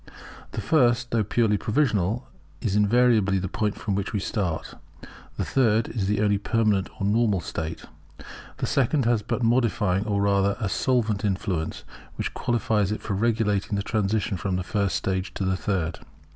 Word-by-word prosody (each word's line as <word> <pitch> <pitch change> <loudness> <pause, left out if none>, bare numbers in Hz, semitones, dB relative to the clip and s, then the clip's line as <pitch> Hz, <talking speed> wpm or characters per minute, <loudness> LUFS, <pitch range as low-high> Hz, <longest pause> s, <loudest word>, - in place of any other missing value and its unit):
The - - -3
first, 120 -5 +2
though 115 -2 +2
purely 105 -1 +1
provisional, 110 -3 0 0.3
is 105 -6 -1
invariably 105 -2 +3
the 95 0 -2
point 105 +2 -1
from 105 - -3
which 100 +3 -2
we 105 - 0
start; 95 -5 -2 0.6
the - - -1
third 115 -4 +2
is 105 -5 -2
the 105 +1 +1
only 105 -1 +2
permanent 105 -3 +1
or 100 - -1
normal 105 -1 +2
state; 80 -1 -5 0.7
the - - -2
second 135 0 +1
has 115 -2 +2
but 115 +3 -3
a - - +2
modifying 110 -4 +1
or 100 -1 0
rather 100 0 +2
a 105 -4 -1
solvent 115 -3 0
influence, 95 -5 -2 0.3
which - - -3
qualifies 110 -4 0
it 110 - -4
for 105 - -2
regulating 105 -1 0
the 100 - -1
transition 105 -2 0
from 95 +1 -2
the 90 - -1
first 100 +1 -1
stage 95 0 -2
to 95 - -2
the 95 0 +1
third. 90 -4 -2
105 Hz, 170 wpm, -25 LUFS, 95-115 Hz, 0.7 s, invariably